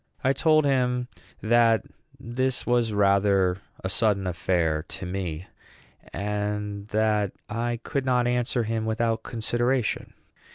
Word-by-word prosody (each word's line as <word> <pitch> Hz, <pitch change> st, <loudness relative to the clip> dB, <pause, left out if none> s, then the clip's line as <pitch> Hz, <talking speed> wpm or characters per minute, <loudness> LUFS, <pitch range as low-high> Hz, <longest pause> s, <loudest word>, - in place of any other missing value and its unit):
I 135 Hz, +1 st, +3 dB
told 155 Hz, +2 st, +3 dB
him 125 Hz, -2 st, +1 dB, 0.3 s
that 115 Hz, -1 st, +4 dB, 0.3 s
this 130 Hz, +2 st, -2 dB
was 120 Hz, -2 st, +2 dB
rather 100 Hz, -2 st, +3 dB, 0.2 s
a -, -, -1 dB
sudden 100 Hz, -1 st, +2 dB
affair 85 Hz, -3 st, 0 dB
to -, -, -6 dB
me, 90 Hz, -2 st, -4 dB, 0.7 s
and 105 Hz, 0 st, -3 dB
that 105 Hz, -2 st, +1 dB
I 115 Hz, +2 st, -2 dB
could 140 Hz, -, -2 dB
not 125 Hz, -2 st, +2 dB
answer 120 Hz, 0 st, 0 dB
him 110 Hz, 0 st, -2 dB
without 115 Hz, 0 st, 0 dB
consideration. 120 Hz, +1 st, -1 dB
110 Hz, 120 wpm, -26 LUFS, 100-120 Hz, 0.7 s, that